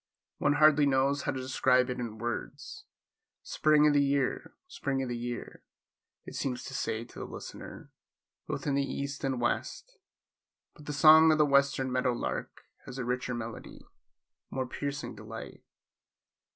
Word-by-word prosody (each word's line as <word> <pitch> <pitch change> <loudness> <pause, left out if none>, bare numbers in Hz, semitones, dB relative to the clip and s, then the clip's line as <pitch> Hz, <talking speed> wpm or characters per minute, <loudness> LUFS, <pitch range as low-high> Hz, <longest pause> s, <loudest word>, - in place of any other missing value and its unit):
One 145 - +3
hardly 150 -1 +5
knows 140 +1 +2
how - - -1
to 130 - -4
describe 130 -1 +2
it 125 - -4
in 115 -3 -5
words. 120 +1 -5 0.6
Spring 150 -1 +3
o' 150 - +5
the 145 0 +4
year! 140 -1 -1
Spring 140 - -2
o' - - -4
the 120 - -3
year! 120 0 -6 0.6
it - - -9
seems 130 -2 -3
to 135 - -8
say 115 -4 -2
to - - -12
the - - -5
listener, - - -9 0.6
both - - -4
in 145 - 0
the 140 - +2
east 140 +1 -4
and 135 -2 -1
west, 470 - -3 0.7
but 150 - -16
the - - -2
song 155 +2 +8
of 155 - +3
the 150 - +5
western 140 -2 +2
meadow 125 -1 +1
lark - - -4 0.2
has 125 - -8
a 125 - -3
richer 125 0 -2
melody, 115 -1 -8 0.7
a - - -8
more 130 -1 -1
piercing 140 -1 -5
delight. 110 +1 -9
135 Hz, 165 wpm, -30 LUFS, 125-145 Hz, 0.7 s, song